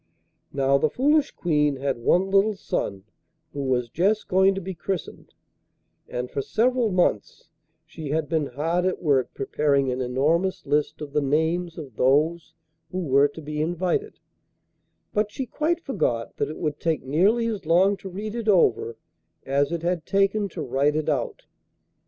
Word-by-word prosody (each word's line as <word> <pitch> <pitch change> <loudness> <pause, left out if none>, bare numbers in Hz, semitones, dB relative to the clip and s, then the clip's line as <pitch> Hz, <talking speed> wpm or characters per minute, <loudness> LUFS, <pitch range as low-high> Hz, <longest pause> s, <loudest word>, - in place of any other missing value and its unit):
Now, 140 0 +2
the 155 - +2
foolish 285 - +2
Queen 150 -4 +1
had 135 -2 -2
one 180 +10 +2
little 200 +2 +3
son 100 - -3 0.5
who 140 - -4
was 125 -3 0
just 200 - 0
going 190 +1 +4
to - - -2
be 190 0 -6
christened, 180 0 -5 0.7
and 125 0 -4
for 140 - -2
several 245 - +1
months 180 -2 0 0.4
she 155 -2 -8
had 155 +1 0
been 155 -2 0
hard 165 +7 -1
at 185 - -1
work 140 -6 +1
preparing 140 -1 +1
an 125 +1 -2
enormous 150 +9 0
list 150 +2 0
of 145 -2 -7
the 150 - +2
names 160 +5 0
of 140 -9 -9
those 150 +6 +2 0.3
who 185 - -5
were 140 -1 +4
to 145 +3 -11
be 150 +1 -3
invited, 175 - -1 1.0
but 210 0 +1
she 265 - -4
quite 320 +6 -1
forgot 120 - -2
that - - -1
it 155 - -7
would 150 -3 -3
take 160 -5 -1
nearly 190 - +2
as 215 -8 -3
long 185 +5 +4
to 190 - -8
read 205 +4 -5
it 230 -2 -4
over 120 - +3 0.5
as 140 +2 +1
it 170 -1 -3
had 175 -2 -1
taken 200 +1 +1
to - - -5
write 140 +4 +1
it 155 0 -1
out. 135 -5 -2
160 Hz, 170 wpm, -24 LUFS, 140-195 Hz, 1.0 s, going